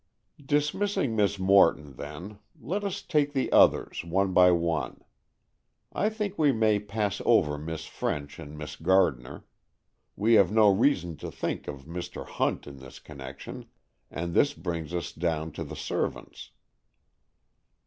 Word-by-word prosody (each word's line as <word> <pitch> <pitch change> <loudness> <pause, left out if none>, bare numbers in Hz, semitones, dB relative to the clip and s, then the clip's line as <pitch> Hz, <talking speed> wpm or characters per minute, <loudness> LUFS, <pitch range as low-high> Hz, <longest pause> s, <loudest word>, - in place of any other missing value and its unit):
"Dismissing 150 - 0
Miss 100 -1 +2
Morton, 95 -7 +3
then, 85 +10 -8 0.2
let 185 - -3
us 200 -1 -3
take 145 -2 +1
the 135 -2 -1
others, - - +4
one 95 +3 0
by 90 0 +7
one. 85 -2 -1 0.9
I 210 - +1
think 210 -3 -4
we 150 -3 +5
may 110 -3 +2
pass 105 -1 -2
over 75 -11 +3
Miss 80 +1 -6
French 70 -1 -4
and 75 +1 -9
Miss 75 0 -7
Gardner. 85 -8 +1 0.7
We 110 +4 +2
have 100 -4 +5
no 110 -1 +5
reason 90 - +1
to - - -6
think - - -4
of 70 -2 -7
Mr. 85 +2 -6
Hunt - - -1
in 70 -1 -10
this 65 -1 -12
connection, 65 -2 -9 0.4
and 85 +1 -4
this 145 +7 +3
brings 85 -3 -4
us 85 -1 -3
down 80 -1 -2
to 80 - -6
the 75 0 -8
servants." - - -4
90 Hz, 145 wpm, -27 LUFS, 80-110 Hz, 0.9 s, by